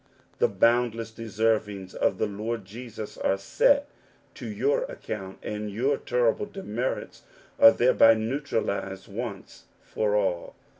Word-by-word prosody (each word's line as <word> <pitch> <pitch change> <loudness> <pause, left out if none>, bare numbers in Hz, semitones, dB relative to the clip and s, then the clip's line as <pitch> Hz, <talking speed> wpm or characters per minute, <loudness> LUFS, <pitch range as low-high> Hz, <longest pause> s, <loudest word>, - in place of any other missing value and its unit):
Ti^ 100 - +1
boundless 115 0 +2
deservings 110 -4 -1
of - - +1
the - - +1
Lord 105 +1 -4
Jesus 110 +1 -8
are 95 - +1
5 280 - +3 0.5
to - - -8
your - - +1
account, 105 - -7
and 105 0 -4
your 125 +8 +1
terrible 120 - 0
demerits 130 - -4 0.4
a 115 - +10
thereby 115 -2 +5
neutralized 110 -6 -2
once 105 -2 -7 0.2
for 105 -1 -1
all. 95 -4 -1
110 Hz, 120 wpm, -26 LUFS, 100-120 Hz, 0.5 s, a